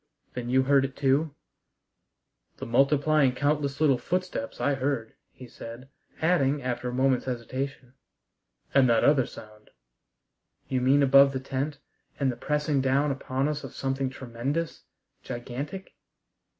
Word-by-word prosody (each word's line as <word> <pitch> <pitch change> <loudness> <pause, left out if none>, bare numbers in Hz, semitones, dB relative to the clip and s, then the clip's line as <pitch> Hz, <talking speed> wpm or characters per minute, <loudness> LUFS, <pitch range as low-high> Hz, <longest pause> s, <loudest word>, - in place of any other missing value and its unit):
"Then 120 -1 -5
you 130 +1 +3
heard 140 0 +4
it 135 0 -4
too?" 140 +2 +1 1.2
"The - - -6
multiplying 140 +2 +3
countless 145 0 0
little 140 -5 +3
footsteps 180 -6 -3
I 145 - +1
heard," 135 -4 -2 0.2
he 130 - -13
said, 120 +3 -10 0.3
adding, 150 -5 +2
after 125 0 -2
a - - -4
moment's 130 0 +1
hesitation, 130 +1 -5 0.8
"and 135 -2 +5
that 115 -1 +3
other 140 -4 +4
sound 105 0 -13 0.5
" - - -49
"You 130 -1 0
mean 135 +3 +4
above 140 0 +6
the 130 - -2
tent, 135 +2 -3 0.4
and 135 -2 +2
the - - -6
pressing 150 +1 0
down 135 +2 +2
upon 135 0 -2
us 150 -1 -3
of 135 - -9
something 135 0 -1
tremendous, 130 +6 -4 0.4
gigantic?" 135 +10 -6
135 Hz, 140 wpm, -27 LUFS, 125-145 Hz, 1.2 s, above